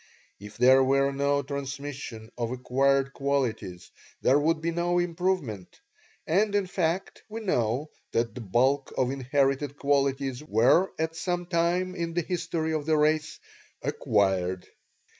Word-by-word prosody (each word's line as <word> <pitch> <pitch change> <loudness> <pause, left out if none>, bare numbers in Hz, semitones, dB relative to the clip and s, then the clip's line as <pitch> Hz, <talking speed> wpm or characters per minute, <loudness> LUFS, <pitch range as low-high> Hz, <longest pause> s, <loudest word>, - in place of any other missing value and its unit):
If 105 +1 -11
there 130 +2 +6
were 135 +1 +2
no 140 +1 +1
transmission 140 -4 -6
of 120 -2 -2
acquired 135 +2 +1
qualities 125 -10 -2 0.3
there 135 +3 +5
would 160 +2 +1
be 165 +1 -1
no 175 +1 0
improvement 175 - -2 0.5
and 205 +5 +2
in 200 -1 +2
fact, 180 0 -2
we 220 +2 -5
know 135 - 0 0.2
that 115 -1 0
the 125 - -7
bulk 130 +7 +1
of 130 0 +1
inherited 140 +1 0
qualities 140 -1 0
were 140 - +3
at 160 +1 -2
some 175 +1 -2
time 175 +1 0
in 170 -2 -4
the 175 - +1
history 165 -2 -2
of 155 -1 -2
the 155 -1 +3
race 155 +1 +1 0.4
"acquired." 95 -3 0
140 Hz, 140 wpm, -27 LUFS, 125-165 Hz, 0.5 s, there